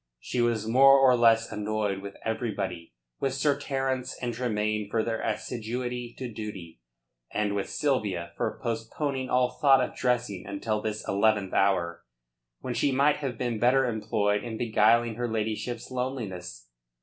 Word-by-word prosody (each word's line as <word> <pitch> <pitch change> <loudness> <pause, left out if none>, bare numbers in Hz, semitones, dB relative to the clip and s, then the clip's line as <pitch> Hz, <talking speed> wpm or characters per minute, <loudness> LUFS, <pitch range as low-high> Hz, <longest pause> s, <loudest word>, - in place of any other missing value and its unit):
She 120 - -2
was 115 -2 +1
more 135 +4 +7
or 135 -2 +6
less 115 -1 +4
annoyed 105 -2 -1
with 100 0 -8
everybody 100 - -3 0.2
with 135 -1 -1
Sir 140 +1 +2
Terence 135 -2 -2
and 120 -1 -2
Tremayne 110 -3 -1
for 110 +1 +1
their 115 0 -2
assiduity 120 +2 -3
to 130 - -4
duty, 95 - -7 0.5
and 105 -1 0
with 100 -1 -2
Sylvia 105 -12 -1
for - - -2
postponing 130 +4 -2
all 125 0 +2
thought 135 -3 +7
of 125 - -2
dressing 120 -6 -1
until 105 +2 -2
this 110 0 -4
eleventh 100 -1 +2
hour, 85 -3 +1 0.6
when 125 - -3
she 140 - +1
might 140 +3 +3
have 135 -5 -4
been 120 -3 -2
better 130 +3 +4
employed 105 -3 0
in 115 -2 -5
beguiling 115 0 +3
her 120 0 -1
ladyship's 110 +2 -3
loneliness. 100 - -5
115 Hz, 150 wpm, -27 LUFS, 105-125 Hz, 0.6 s, more